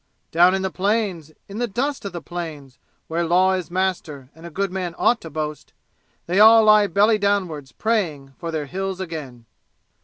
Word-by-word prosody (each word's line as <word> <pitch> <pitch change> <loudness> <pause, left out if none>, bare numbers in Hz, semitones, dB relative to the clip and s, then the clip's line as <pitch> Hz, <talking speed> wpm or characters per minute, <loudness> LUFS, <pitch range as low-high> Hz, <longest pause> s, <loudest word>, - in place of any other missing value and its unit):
Down 175 +3 +5
in 190 - -2
the 190 - -2
plains, 195 -6 -1 0.2
in 200 +3 -7
the 240 - 0
dust 265 +4 -3
of 200 - -4
the 170 -2 -7
plains 155 -6 -7 0.3
Where 165 +1 -1
law 180 +3 +3
is 185 -2 -3
master 175 -7 -3
and 165 +2 -12
a - - -8
good 195 +3 -2
man 180 -3 -4
ought 240 - +2
to 165 - -8
boast, 150 0 -5 0.5
They 180 +3 0
all 220 +1 +8
lie 215 -1 +6
belly 210 +4 +3
downwards 185 -9 -1
praying 155 - -2
for 170 - -5
their 155 -2 -3
Hills 190 +4 -4
again! 150 -10 -7
180 Hz, 185 wpm, -22 LUFS, 160-200 Hz, 0.5 s, all